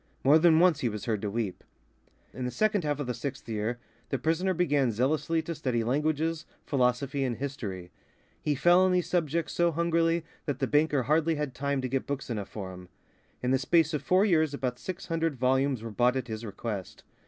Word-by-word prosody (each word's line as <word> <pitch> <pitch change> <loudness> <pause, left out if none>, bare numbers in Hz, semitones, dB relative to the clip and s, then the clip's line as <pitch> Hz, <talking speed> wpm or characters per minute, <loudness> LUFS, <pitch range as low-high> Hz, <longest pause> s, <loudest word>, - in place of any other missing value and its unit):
More 145 +4 +6
than 160 -1 +5
once 170 -3 +4
he 125 - 0
was 105 -1 -6
heard 110 -4 -1
to 105 - -2
weep. 105 -3 -3 0.7
In 130 - -5
the - - -1
second 210 +5 +1
half 145 -1 -1
of 145 - -2
the 125 - -2
sixth 140 0 -6
year, 110 +2 -2 0.3
the 135 - 0
prisoner 165 +7 0
began 145 -7 +2
zealously 155 +8 0
to 170 - -4
study 130 -7 -1
languages, 155 +5 0 0.2
philosophy, 135 +1 +1
and 125 -3 -1
history. 100 -11 -5 0.5
He 150 - 0
fell 175 +6 +5
on 185 0 +4
these 180 -1 +1
subjects 170 -2 0
so 175 0 +2
hungrily 165 0 +1 0.2
that 145 -3 -1
the - - 0
banker 150 -2 +2
hardly 160 +4 +2
had 150 -3 -3
time 140 +1 -1
to 130 - -2
get 135 +1 -2
books 140 -3 -4
enough 105 -4 -4
for 95 -3 -6
him. 90 0 -12 0.5
In 125 - +1
the 130 - +3
space 160 +3 +3
of 150 - -1
four 185 +3 +3
years 160 -7 +2
about 125 -3 -3
six 185 0 -6
hundred 165 -3 -1
volumes 130 -1 +1
were 115 - -5
bought 125 +4 +2
at 125 -2 -4
his 110 +1 -5
request. 100 -2 -6
140 Hz, 210 wpm, -28 LUFS, 125-165 Hz, 0.7 s, More